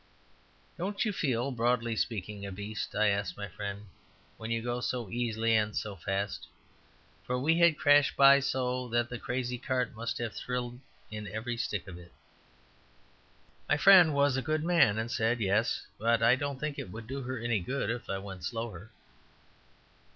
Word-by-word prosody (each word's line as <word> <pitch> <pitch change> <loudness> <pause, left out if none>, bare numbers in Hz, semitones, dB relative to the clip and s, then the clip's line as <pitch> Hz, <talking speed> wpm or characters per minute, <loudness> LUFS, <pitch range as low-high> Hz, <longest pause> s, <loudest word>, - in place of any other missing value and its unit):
"Don't 200 +5 -1
you 215 - 0
feel, 130 -5 0
broadly 120 -1 0
speaking, 105 0 -3
a 100 - -5
beast," 105 +3 -5
I 105 0 +3
asked 100 0 -1
my 100 0 -5
friend, 100 +2 -6 0.5
"when 110 - -6
you 115 0 0
go 120 0 -2
so 120 -6 -3
easily 115 -1 0
and 105 -1 +1
so 105 -2 -3
fast?" 95 +2 -3 0.8
For 125 - -2
we 160 +6 +2
had 170 -3 +5
crashed 145 0 +4
by 140 0 +8
so 125 -2 -1
that 120 0 0
the 120 - -5
crazy 125 -1 -3
cart 125 -2 -1
must 115 +1 -3
have 115 -2 -3
thrilled 125 -1 -4 0.3
in 105 -1 -6
every 110 +5 -4
stick 105 -5 -3
of 90 -2 -9
it. 85 0 -15 1.6
My 150 - +4
friend 175 -1 +7
was 140 -1 +3
a - - 0
good 155 +4 -1
man, 165 -12 +4
and 115 +1 -2
said, 115 +1 +1
"Yes. 105 +3 +1
But 115 +1 +2
I 120 +2 +6
don't 140 0 -4
think 150 -1 -3
it - - -6
would 110 +4 -8
do 135 +4 -5
her 130 0 -4
any 120 -1 0
good 120 +3 -2
if 120 0 -6
I 100 - -1
went 95 -2 -8
slower." 110 -2 -5
120 Hz, 180 wpm, -30 LUFS, 105-130 Hz, 1.6 s, by